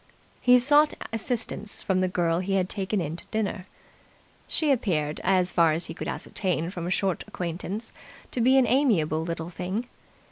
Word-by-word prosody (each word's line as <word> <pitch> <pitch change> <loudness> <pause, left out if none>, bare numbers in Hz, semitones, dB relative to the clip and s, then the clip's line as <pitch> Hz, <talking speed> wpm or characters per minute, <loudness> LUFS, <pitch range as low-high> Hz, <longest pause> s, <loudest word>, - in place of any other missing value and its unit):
He 250 0 +7
sought 290 +4 +4 0.2
assistance 225 -2 -2
from 185 -1 0
the 185 - +2
girl 170 -2 +1
he 195 +1 -1
had 185 -1 +1
taken 200 0 -1
in 160 -2 -3
to - - -7
dinner. 205 -4 -2 0.8
She 310 -3 +1
appeared, 155 - 0
as 185 -1 +2
far 165 -2 +4
as 165 +3 -2
he - - -6
could - - -6
ascertain 180 -3 -2
from 175 -3 -5
a - - -2
short 190 -1 0
acquaintance, 180 +6 -4 0.4
to 245 - -1
be 260 +3 +5
an 260 - +5
amiable 205 - +2
little 165 0 -4
thing. 185 +7 -3
190 Hz, 175 wpm, -26 LUFS, 170-225 Hz, 0.8 s, He